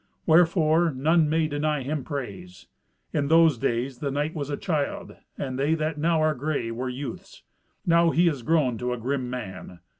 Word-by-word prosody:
Wherefore 165 Hz, 0 st, +4 dB
none 155 Hz, +3 st, +2 dB
may 160 Hz, 0 st, +2 dB
deny 150 Hz, -1 st, -1 dB
him 145 Hz, +1 st, -3 dB
praise. 100 Hz, -, -7 dB, 0.5 s
In 145 Hz, -2 st, 0 dB
those 160 Hz, -4 st, +5 dB
days 125 Hz, 0 st, -1 dB
the 140 Hz, -, -2 dB
knight 145 Hz, +3 st, -2 dB
was 145 Hz, -3 st, -4 dB
a 145 Hz, -, -2 dB
child, 185 Hz, +4 st, -3 dB, 0.2 s
and 130 Hz, -1 st, -4 dB
they 150 Hz, +4 st, +2 dB
that 155 Hz, -1 st, -2 dB
now 165 Hz, +1 st, +2 dB
are 155 Hz, 0 st, +3 dB
grey 140 Hz, -4 st, -2 dB
were 125 Hz, +3 st, -3 dB
youths. 170 Hz, +9 st, -7 dB, 0.4 s
Now 170 Hz, -1 st, +4 dB
he 170 Hz, +2 st, +3 dB
is 145 Hz, -6 st, 0 dB
grown 130 Hz, -4 st, +1 dB
to 125 Hz, 0 st, -1 dB
a -, -, -4 dB
grim 125 Hz, +1 st, -2 dB
man. 100 Hz, -7 st, -7 dB
145 Hz, 180 wpm, -25 LUFS, 130-160 Hz, 0.5 s, those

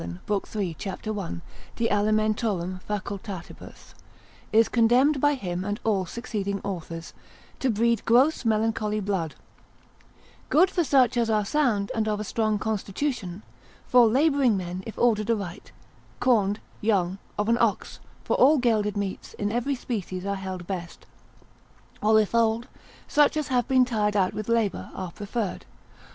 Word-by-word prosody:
l. 90 Hz, -, -2 dB
3. 195 Hz, -5 st, -4 dB
c. 195 Hz, +2 st, -5 dB
1. 185 Hz, -, -4 dB, 0.3 s
de 230 Hz, -, +1 dB
alim. 210 Hz, -3 st, +1 dB
fac.) 210 Hz, -2 st, -3 dB, 1.4 s
is 225 Hz, +1 st, +5 dB
condemned 250 Hz, +5 st, +3 dB
by 290 Hz, 0 st, +4 dB
him 180 Hz, -7 st, -4 dB
and 205 Hz, +2 st, -3 dB
all 195 Hz, -5 st, +1 dB
succeeding 200 Hz, -2 st, -3 dB
Authors, 170 Hz, -4 st, -6 dB, 0.5 s
to 265 Hz, -, +1 dB
breed 235 Hz, +1 st, +1 dB
gross 260 Hz, +7 st, +3 dB
melancholy 215 Hz, -1 st, 0 dB
blood: 190 Hz, -6 st, -2 dB, 1.1 s
good 360 Hz, +5 st, +4 dB
for 350 Hz, -, +1 dB
such 255 Hz, -4 st, +3 dB
as 230 Hz, -1 st, +1 dB
are 210 Hz, -2 st, +2 dB
sound, 220 Hz, -5 st, +1 dB
and 220 Hz, -1 st, -1 dB
of 210 Hz, -1 st, 0 dB
a -, -, -2 dB
strong 215 Hz, 0 st, 0 dB
constitution, 210 Hz, -1 st, -3 dB, 0.4 s
for 245 Hz, -2 st, +6 dB
labouring 270 Hz, -2 st, +3 dB
men 180 Hz, 0 st, -5 dB
if 225 Hz, -, -8 dB
ordered 220 Hz, -2 st, +2 dB
aright, 200 Hz, -6 st, -3 dB, 0.5 s
corned, 210 Hz, -5 st, +2 dB, 0.2 s
young, 195 Hz, -3 st, +1 dB, 0.2 s
of 210 Hz, 0 st, 0 dB
an 235 Hz, +1 st, +2 dB
ox -, -, 0 dB, 0.2 s
(for -, -, 0 dB
all 295 Hz, +4 st, +6 dB
gelded 215 Hz, -5 st, +1 dB
meats 200 Hz, -2 st, -4 dB
in 205 Hz, 0 st, -2 dB
every 245 Hz, +5 st, 0 dB
species 195 Hz, -7 st, -4 dB
are 200 Hz, -, -1 dB
held 190 Hz, -2 st, -6 dB
best), 175 Hz, -2 st, -6 dB, 1.0 s
or 220 Hz, +1 st, +5 dB
if 215 Hz, 0 st, 0 dB
old, 230 Hz, +1 st, +2 dB, 0.4 s
such 295 Hz, +1 st, +3 dB
as 305 Hz, -, -2 dB
have 250 Hz, -2 st, +1 dB
been 260 Hz, -2 st, +4 dB
tired 210 Hz, -4 st, 0 dB
out 185 Hz, -2 st, +2 dB
with 215 Hz, +1 st, -5 dB
labour, 230 Hz, -4 st, 0 dB
are 185 Hz, -2 st, -5 dB
preferred. 205 Hz, +1 st, -4 dB
215 Hz, 150 wpm, -26 LUFS, 195-235 Hz, 1.4 s, for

